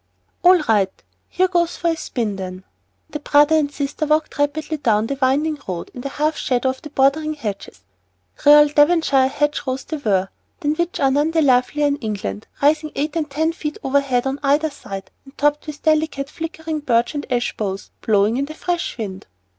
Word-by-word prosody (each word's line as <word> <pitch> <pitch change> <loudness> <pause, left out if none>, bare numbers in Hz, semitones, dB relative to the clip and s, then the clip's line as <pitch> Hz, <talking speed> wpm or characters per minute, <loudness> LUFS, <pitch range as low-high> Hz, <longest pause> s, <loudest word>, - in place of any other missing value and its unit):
"All 360 +1 +7
right. 205 -6 +2 0.4
Here 370 - +2
goes 345 -2 0
for 340 - 0
a 330 - +1
spin, 225 -10 -3
then." 185 -1 -7 0.5
The 300 - -4
brother 295 +2 +4
and 295 -2 +1
sister 285 +1 -3
walked 305 0 0
rapidly 305 +2 -1
on - - -27
down 215 -3 +2
the 275 +3 -4
winding 290 +4 +1
road, 180 -3 -5
in 245 - -7
the 275 - -4
half 305 +3 0
shadow 255 0 0
of 260 0 -5
the 300 - -9
bordering 300 +3 +1
hedges. 205 - -6 0.6
Real 295 +1 +8
Devonshire 295 -3 +4
hedge 295 +2 -1
rows 260 +1 -2
they 315 - -5
were, 195 -8 0 0.3
than 295 -1 +1
which 345 +2 -2
are 270 -1 +3
none 290 +3 +2
lovelier 290 -1 +3
in 285 0 +1
England, 210 -3 -5 0.2
rising 305 +1 +3
eight 295 +2 -2
and 310 -3 -1
ten 315 +4 0
feet 300 -2 -5
overhead 270 -2 +1
on 270 +1 -2
either 295 +2 +2
side, 195 -8 -8
and 270 - -17
topped 295 +1 +1
with 300 -1 -8
delicate, 310 -3 +1
flickering 320 -1 -5
birch 240 -3 +1
and 290 -2 -5
ash 245 -1 0
boughs 195 -2 -4
blowing 215 +2 +2
in 275 - 0
the 310 +2 -9
fresh 345 -2 -3
wind. 195 -5 -6
285 Hz, 195 wpm, -20 LUFS, 250-310 Hz, 0.6 s, Real